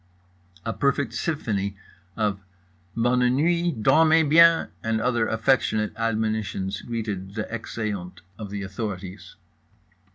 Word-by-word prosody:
A 115 - -1
perfect 140 -3 0
symphony 105 - -2 0.4
of 105 -3 0 0.6
"Bonne 125 +1 +2
nuits" 170 0 +1
"Dormez 160 +7 +4
biens" 170 0 +6
and 115 0 0
other 120 -1 +1
affectionate 110 -2 +1
admonitions 110 -3 -2
greeted 105 -5 -5
the 110 - -2
exeunt 100 -6 -5 0.2
of 105 -2 -6
the 100 0 -5
authorities. 95 -1 -6
110 Hz, 105 wpm, -25 LUFS, 100-125 Hz, 0.6 s, biens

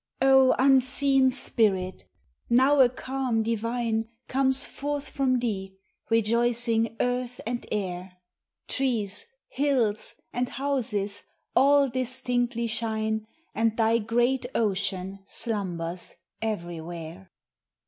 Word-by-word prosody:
O 265 0 +6
unseen 270 0 +4
Spirit! 200 -7 0 0.4
now 265 +4 +5
a 255 -2 +7
calm 255 -2 -2
divine 230 0 -1 0.2
Comes 265 0 +2
forth 290 0 -4
from 265 -2 +1
thee, 195 -5 -3 0.3
rejoicing 230 0 +1
earth 245 0 -1
and 240 +1 -3
air! 180 -2 -4 0.5
Trees, 225 -7 -1 0.2
hills, 255 -7 0 0.2
and 245 0 -1
houses, 225 -7 -2 0.3
all 280 +1 +5
distinctly 245 -1 -1
shine, 220 -1 -1 0.3
And 225 0 +1
thy 225 0 +3
great 240 +3 +1
ocean 195 -2 -1
slumbers 180 -7 -3 0.3
everywhere. 175 -3 -5
230 Hz, 95 wpm, -27 LUFS, 210-260 Hz, 0.5 s, a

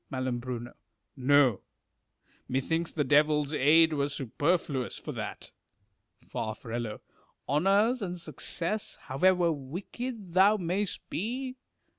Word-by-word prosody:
Hal 130 -2 -2 0.8
No: 130 -4 +4 0.9
methinks 160 +6 -1
the 150 - 0
devil's 150 +1 +3
aid 155 +3 +5
were 140 -1 0
superfluous 145 0 -1
for - - -6
that. - - -6 0.8
Far. 110 -1 -3 0.9
Honours 200 - +3
and 180 -2 -3
success, 170 +5 -2
however 175 +5 +3
wicked 185 - -6
thou 195 +4 +6
mayst 185 +2 -2
be 255 +7 -3
165 Hz, 95 wpm, -29 LUFS, 140-190 Hz, 0.9 s, thou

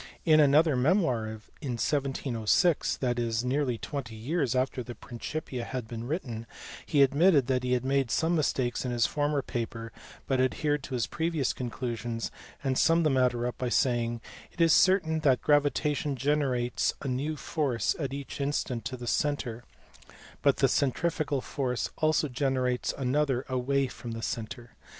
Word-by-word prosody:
In 155 -2 +6
another 150 +1 +5
memoir 130 - +2
in 110 - -5 0.4
1706, 135 - +1
that 120 -2 -1
is, 115 0 -1
nearly 130 -2 0
twenty 125 -3 -5
years 130 +3 -1
after 130 0 0
the 120 0 -7
Principia 125 +1 -5
had 125 -1 -5
been 115 +1 -6
written, 120 -8 -4 0.4
he 145 -3 +5
admitted 145 +1 +4
that 130 0 +1
he 125 0 +1
had 125 0 0
made 135 -2 +1
some 165 +8 +1
mistakes 130 -5 0
in 125 - -2
his 120 -2 +2
former 145 -1 0
paper 115 -2 -4 0.3
but 130 -2 +1
adhered 145 +3 0
to 130 - -4
his 120 - 0
previous 160 -5 -1
conclusions, 120 -1 -4 0.3
and 130 -2 +1
summed 165 0 +4
the 155 - +3
matter 125 -2 +2
up 125 - -4
by 125 - -1
saying 120 -2 +1 0.3
"it - - -19
is 165 -1 +5
certain 160 -3 +4
that 135 -5 +2
gravitation 145 0 +2
generates 130 -2 0
a - - -4
new 135 +5 -1
force 140 -4 -1
at 140 -4 -2
each 140 +1 -6
instant 135 -4 -1
to 130 - -4
the 120 - -7
centre, 120 -3 -1 0.8
but - - +3
the - - +4
centrifugal 145 0 0
force 125 -3 -2
also 155 0 +2
generates 130 -2 0
another 135 0 0
away 135 +2 +1
from 120 -2 -7
the 115 0 -6
centre. 120 +1 -5
130 Hz, 160 wpm, -29 LUFS, 120-145 Hz, 0.8 s, In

